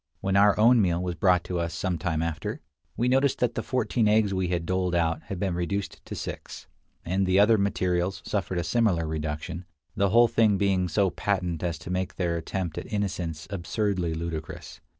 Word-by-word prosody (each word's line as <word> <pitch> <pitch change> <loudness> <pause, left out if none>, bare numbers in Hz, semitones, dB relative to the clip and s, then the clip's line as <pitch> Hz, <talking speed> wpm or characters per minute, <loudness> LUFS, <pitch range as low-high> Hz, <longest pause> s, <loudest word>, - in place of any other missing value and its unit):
When 95 0 -1
our 100 +1 +5
own 115 +2 +6
meal 85 -3 +1
was 90 0 -2
brought 90 +1 +3
to 90 -1 -3
us 85 -1 -2
some 90 -3 -2
time 80 -1 -1
after, 80 -1 -3 0.4
we 120 - +1
noticed 135 +2 +3
that 120 -1 0
the 115 - -2
fourteen 120 -2 0
eggs 105 -1 +3
we 95 -1 0
had 85 -2 -1
doled 90 0 0
out 80 -1 +1
had 95 - -5
been 95 -2 -1
reduced 95 +3 -3
to - - -5
six; - - -7 0.4
and 95 +2 0
the 95 +1 +3
other 110 +2 +6
materials 95 -1 0
suffered 95 -3 -2
a 85 - 0
similar 85 -2 +1
reduction, 80 +2 -4 0.3
the 100 0 +2
whole 120 +4 +6
thing 110 -3 +3
being 95 -2 +1
so 95 +2 +1
patent 90 -5 -1
as 85 -2 -2
to 80 +3 -8
make 95 0 -2
their 85 -3 -1
attempt 85 0 -3
at - - -10
innocence 90 -6 -3
absurdly 95 -2 -1
ludicrous. 80 -1 -6
90 Hz, 195 wpm, -26 LUFS, 85-100 Hz, 0.4 s, own